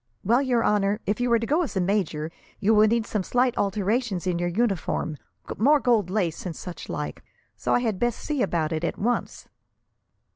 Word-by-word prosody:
"Well, 235 Hz, +6 st, +3 dB
your 245 Hz, -4 st, +1 dB
honour, 205 Hz, 0 st, +2 dB
if 205 Hz, +3 st, -1 dB
you 245 Hz, -1 st, +1 dB
are 235 Hz, -, +6 dB
to 230 Hz, -, -2 dB
go 305 Hz, +8 st, +2 dB
as 275 Hz, -, -3 dB
a -, -, +3 dB
major, 175 Hz, -5 st, -1 dB, 0.3 s
you 215 Hz, +2 st, +3 dB
will 215 Hz, 0 st, +6 dB
need 230 Hz, 0 st, +1 dB
some 210 Hz, -, -1 dB
slight 245 Hz, +5 st, +1 dB
alterations 205 Hz, 0 st, 0 dB
in 180 Hz, -2 st, 0 dB
your 175 Hz, 0 st, 0 dB
uniform 185 Hz, -6 st, -1 dB, 0.4 s
more 290 Hz, +7 st, +5 dB
gold 230 Hz, -8 st, +2 dB
lace, 185 Hz, -5 st, -1 dB
and 175 Hz, -4 st, -5 dB
such 180 Hz, -2 st, -8 dB
like. -, -, -4 dB, 0.3 s
So -, -, 0 dB
I -, -, +2 dB
had 220 Hz, -6 st, -1 dB
best 240 Hz, -1 st, 0 dB
see 295 Hz, -4 st, -2 dB
about 170 Hz, -6 st, 0 dB
it, 160 Hz, 0 st, -2 dB
at 170 Hz, -, -2 dB
once." 240 Hz, +4 st, -2 dB
210 Hz, 205 wpm, -25 LUFS, 185-240 Hz, 0.4 s, are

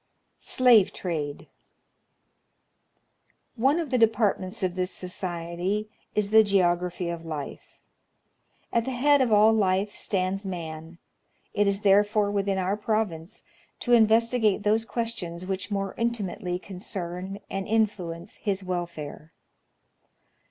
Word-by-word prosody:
Slave 240 Hz, -6 st, +4 dB
Trade. 150 Hz, -5 st, -4 dB, 2.1 s
One 270 Hz, +7 st, +2 dB
of 315 Hz, -5 st, -4 dB
the 250 Hz, -, +2 dB
depai'tments 215 Hz, -3 st, +1 dB
of 185 Hz, -1 st, 0 dB
this 180 Hz, 0 st, -1 dB
society 180 Hz, +3 st, -3 dB, 0.2 s
is 210 Hz, -1 st, 0 dB
the 220 Hz, 0 st, +8 dB
geography 180 Hz, -3 st, +1 dB
of 170 Hz, -1 st, -5 dB
life. 155 Hz, -4 st, -7 dB, 1.0 s
At 230 Hz, -1 st, +2 dB
the 265 Hz, -, -3 dB
head 285 Hz, +2 st, +4 dB
of 250 Hz, -3 st, +2 dB
all 215 Hz, +1 st, +6 dB
life 200 Hz, -1 st, +1 dB
stands 190 Hz, 0 st, -1 dB
man: 165 Hz, -3 st, -6 dB, 0.6 s
it 205 Hz, 0 st, +2 dB
is 200 Hz, 0 st, +1 dB
therefore 205 Hz, +1 st, +3 dB
within 200 Hz, -1 st, 0 dB
our 190 Hz, +1 st, 0 dB
province 210 Hz, -3 st, -2 dB, 0.4 s
to 245 Hz, -, +1 dB
investigate 225 Hz, -2 st, +4 dB
those 220 Hz, +2 st, +2 dB
questions 195 Hz, -8 st, -4 dB
which 190 Hz, +1 st, -4 dB
more 195 Hz, -2 st, -2 dB
intimately 205 Hz, -6 st, -2 dB
concern 185 Hz, 0 st, -6 dB
and 195 Hz, -1 st, -4 dB
influence 200 Hz, -5 st, -1 dB
his 200 Hz, -2 st, -2 dB
welfare. 170 Hz, -4 st, -5 dB
195 Hz, 115 wpm, -26 LUFS, 180-220 Hz, 2.1 s, the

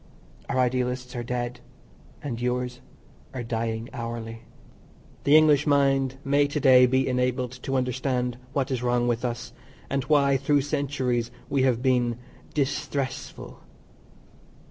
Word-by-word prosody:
Our 135 Hz, -, 0 dB
idealists 125 Hz, 0 st, 0 dB
are 120 Hz, -, -2 dB
dead 120 Hz, 0 st, -3 dB, 0.6 s
and 120 Hz, -4 st, -4 dB
yours 125 Hz, 0 st, -2 dB, 0.5 s
are 125 Hz, -, -3 dB
dying 115 Hz, 0 st, -2 dB
hourly. 115 Hz, -2 st, -5 dB, 0.8 s
The 145 Hz, +2 st, +7 dB
English 150 Hz, -1 st, +4 dB
mind 135 Hz, -2 st, +3 dB
may 145 Hz, +1 st, +3 dB
to 145 Hz, +1 st, -2 dB
day 130 Hz, -2 st, +7 dB
be 130 Hz, +1 st, +2 dB
enabled 125 Hz, -1 st, 0 dB
to 135 Hz, -, -2 dB
understand 125 Hz, -1 st, -1 dB
what 135 Hz, -1 st, -1 dB
is 130 Hz, -2 st, -1 dB
wrong 120 Hz, 0 st, +1 dB
with 120 Hz, 0 st, 0 dB
us, 120 Hz, 0 st, -4 dB, 0.4 s
and 135 Hz, -1 st, 0 dB
why 140 Hz, -3 st, +4 dB
through 140 Hz, +2 st, +2 dB
centuries 135 Hz, -4 st, -1 dB, 0.2 s
we 140 Hz, -, +2 dB
have 125 Hz, -2 st, +2 dB
been 120 Hz, -3 st, +2 dB, 0.4 s
"disthressful." 140 Hz, -1 st, -3 dB
125 Hz, 130 wpm, -26 LUFS, 120-135 Hz, 0.8 s, The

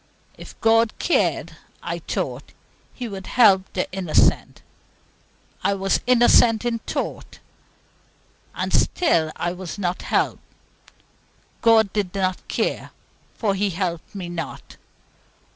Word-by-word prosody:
If -, -, -13 dB
God 225 Hz, 0 st, +3 dB
cared, 355 Hz, -, 0 dB, 0.3 s
I -, -, -4 dB
thought, -, -, -4 dB, 0.4 s
He 245 Hz, -, -6 dB
would 195 Hz, -3 st, -8 dB
help 195 Hz, -6 st, +4 dB
the 185 Hz, -, -1 dB
innocent. 185 Hz, -4 st, +1 dB, 1.0 s
I 200 Hz, -, +2 dB
was 195 Hz, 0 st, 0 dB
innocent 240 Hz, -2 st, +5 dB
in 235 Hz, -1 st, -1 dB
thought, -, -, -5 dB, 1.2 s
and -, -, -3 dB
still 165 Hz, -, +2 dB
I 175 Hz, -, -2 dB
was 180 Hz, -1 st, -7 dB
not 180 Hz, -2 st, -2 dB
helped. -, -, 0 dB, 1.2 s
God 220 Hz, -3 st, +4 dB
did 200 Hz, -3 st, -2 dB
not 185 Hz, -2 st, -2 dB
care, -, -, -2 dB, 0.5 s
for 210 Hz, -4 st, 0 dB
He 200 Hz, +1 st, 0 dB
helped 175 Hz, 0 st, -4 dB
me 185 Hz, -3 st, -5 dB
not. 165 Hz, -3 st, -7 dB
195 Hz, 115 wpm, -22 LUFS, 185-225 Hz, 1.2 s, innocent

